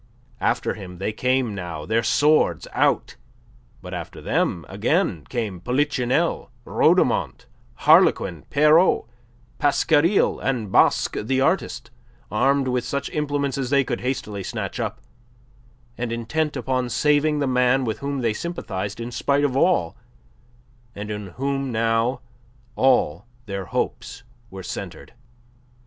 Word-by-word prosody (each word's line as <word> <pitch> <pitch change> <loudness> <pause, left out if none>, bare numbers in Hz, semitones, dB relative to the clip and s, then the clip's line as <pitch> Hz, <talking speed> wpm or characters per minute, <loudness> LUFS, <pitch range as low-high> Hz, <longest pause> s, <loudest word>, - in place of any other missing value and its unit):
After 120 - 0
him 90 -4 -9
they 100 +4 -3
came 125 -1 0
now, 85 -5 -6
their 115 +1 +1
swords 145 +7 +2
out; - - +1 0.7
but - - -8
after - - -6
them - - -1
again 80 -4 0
came 105 -7 -3
Polichinelle, 125 +1 0 0.2
Rhodomont, - - +2 0.4
Harlequin, 85 -4 +4
Pierrot, 150 +5 +4 0.5
Pasquariel, 160 +5 +3
and 120 -7 -2
Basque - - +3
the 130 +5 0
artist, 125 -6 0 0.4
armed 135 +5 +2
with 125 -1 0
such 140 +3 -3
implements 145 -2 -1
as 130 -2 -2
they 140 0 +3
could - - -3
hastily 115 -6 -3
snatch - - -5
up, - - -3 1.0
and 120 -1 -2
intent 130 +7 -2
upon 125 0 -1
saving 150 +3 +2
the 145 - 0
man 125 0 +2
with 110 -2 -3
whom 140 -1 -3
they 115 -3 +1
sympathized 105 - -5
in 120 +1 -5
spite 140 +3 +1
of 135 -3 +1
all, 140 - +2 1.0
and 105 +1 -6
in 105 -1 -5
whom 135 +6 -3
now 115 +2 +1 0.5
all 130 -2 +2 0.2
their 100 -2 -5
hopes - - -3 0.3
were 95 0 -9
centred. - - -7
125 Hz, 130 wpm, -23 LUFS, 110-140 Hz, 1.0 s, Harlequin